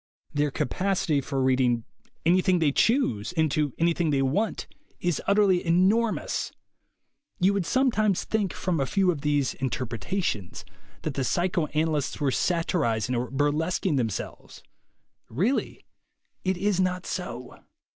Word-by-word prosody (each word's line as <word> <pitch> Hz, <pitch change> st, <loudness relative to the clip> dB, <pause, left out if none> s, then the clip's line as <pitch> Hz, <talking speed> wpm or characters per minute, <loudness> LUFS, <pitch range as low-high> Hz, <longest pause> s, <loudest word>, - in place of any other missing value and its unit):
Their 145 Hz, 0 st, +1 dB
capacity 170 Hz, +1 st, 0 dB
for 135 Hz, 0 st, -2 dB
reading 125 Hz, -3 st, +2 dB, 0.4 s
any 180 Hz, +3 st, +5 dB
thing 185 Hz, -1 st, +2 dB
they 160 Hz, -4 st, +2 dB
choose 175 Hz, -, +1 dB
into 155 Hz, -4 st, +1 dB
anything 170 Hz, 0 st, +1 dB
they 140 Hz, -2 st, +2 dB
want 200 Hz, +12 st, 0 dB, 0.3 s
is 175 Hz, -4 st, -1 dB
utterly 200 Hz, -3 st, +4 dB
enormous. 195 Hz, +7 st, +1 dB, 0.9 s
You 190 Hz, +3 st, +4 dB
would 195 Hz, -4 st, -1 dB
sometimes 215 Hz, -7 st, +2 dB
think 210 Hz, -5 st, -1 dB
from 180 Hz, -4 st, -2 dB
a 135 Hz, -, 0 dB
few 190 Hz, +2 st, +2 dB
of 150 Hz, -5 st, -5 dB
these 145 Hz, -2 st, +1 dB
"interpretations" 120 Hz, -, -3 dB, 0.4 s
that 155 Hz, -, -2 dB
the 135 Hz, -, -2 dB
psychoana 160 Hz, 0 st, 0 dB
lysts 150 Hz, -3 st, -2 dB
were 140 Hz, -3 st, +1 dB
satirizing 135 Hz, -, 0 dB
or 120 Hz, 0 st, -1 dB
burlesquing 150 Hz, +4 st, 0 dB
themselves. 115 Hz, -6 st, -4 dB, 0.7 s
Really 190 Hz, -, -1 dB, 0.6 s
it 185 Hz, -1 st, 0 dB
is 200 Hz, 0 st, 0 dB
not 180 Hz, -1 st, 0 dB
so. 125 Hz, -9 st, -6 dB
160 Hz, 130 wpm, -26 LUFS, 135-185 Hz, 0.9 s, any